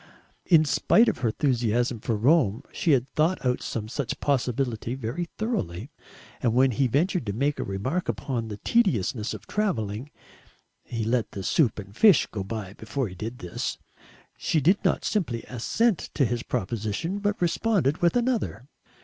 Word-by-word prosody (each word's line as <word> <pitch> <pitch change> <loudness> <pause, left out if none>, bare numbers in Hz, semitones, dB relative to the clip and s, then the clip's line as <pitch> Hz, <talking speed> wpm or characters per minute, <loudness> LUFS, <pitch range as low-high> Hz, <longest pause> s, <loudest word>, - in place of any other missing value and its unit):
In 160 -3 +6
spite 155 +11 +4
of 220 - 0
her 120 - 0
enthusiasm 120 -1 0
for 115 +1 -1
Rome, 120 -3 +3
she 160 - +1
had 130 -1 +2
thought 160 0 +1
out 125 0 +1
some 110 -2 -4
such 125 +1 -3
possibility 125 -3 -1
very 135 +8 -4
thoroughly, 135 - -3 0.5
and 120 -3 +1
when 130 +1 +5
he 135 +3 +1
ventured 165 - +1
to 100 - -1
make 140 +6 0
a - - 0
remark 120 - -2
upon 115 +2 -2
the 105 -2 -6
tediousness 120 - +1
of 110 0 -11
travelling 125 - -2 0.7
he 115 -2 -4
let 115 +1 0
the 95 - -5
soup 120 - +2
and 100 -1 -9
fish 200 - +6
go 100 -3 -3
by 100 -2 -5
before 110 +3 -3
he - - -10
did 110 +6 -6
this 90 -5 -4 0.6
she 160 - 0
did 180 +8 +3
not - - +1
simply 140 - -1
assent 190 - 0
to 140 - +3
his 120 0 -1
proposition, 115 - -2
but 205 0 -1
responded 175 - +1
with 175 +4 +2
another. 235 - 0
125 Hz, 165 wpm, -26 LUFS, 110-165 Hz, 0.7 s, In